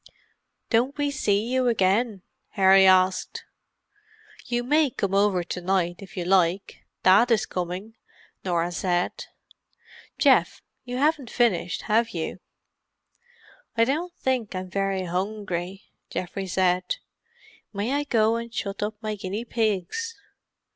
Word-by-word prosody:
"Don't 255 +5 +2
we 290 -1 0
see 210 -6 +1
you 255 +1 +1
again?" 210 -1 +1 0.3
Harry 190 -1 +6
asked. 185 0 +2 1.0
"You 240 0 -1
may 295 +3 +3
come 200 -5 -3
over 195 -2 +3
to 180 +1 -5
night 175 -1 0
if 195 +1 -12
you 175 - -2
like—Dad 190 +4 +2
is 220 -2 +3
coming," 180 +4 -5 0.5
Norah 175 -1 0
said. 175 0 -1 0.9
"Geoff, - - +3 0.2
you 250 0 -4
haven't 290 -3 +1
finished, 220 -9 0
have 225 -1 +1
you?" 165 +2 -4 1.4
"I 230 - +5
don't 320 +8 -1
think 250 -6 -2
I'm 185 0 -5
very 195 -1 -1
hungry," 185 0 -3 0.3
Geoffrey 190 +2 -4
said. 185 - +1 0.8
"May 210 +5 -2
I 290 +1 +1
go 225 -4 +2
and 235 0 -6
shut 200 -3 -4
up 210 +1 -2
my 215 0 -2
guinea 205 +3 -5
pigs?" 230 - -2
200 Hz, 125 wpm, -25 LUFS, 185-235 Hz, 1.4 s, Harry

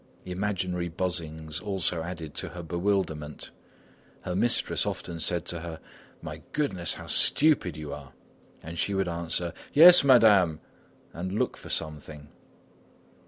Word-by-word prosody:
Imaginary 90 -2 -2
buzzings 80 -4 -4
also 95 -5 -1
added 80 -3 -6
to - - -3
her 90 -1 -8
bewilderment. 85 -4 -2 0.7
Her 90 - -4
mistress 120 +5 +1
often 85 -1 -5
said 85 0 -1
to 85 - -3
her: 80 -1 -7 0.4
"My - - -7
goodness, 95 - -1
how - - -9
stupid 140 - +3
you 75 -2 -6
are!" 70 -2 -10 0.5
and 80 +1 -7
she 100 - 0
would 95 -1 0
answer: 85 0 -2 0.2
"Yes, 175 +3 +9
Madame," 105 - +5 0.5
and 90 +2 -5
look 105 - -1
for - - -12
something. 75 -1 -5
85 Hz, 130 wpm, -27 LUFS, 80-95 Hz, 0.7 s, Yes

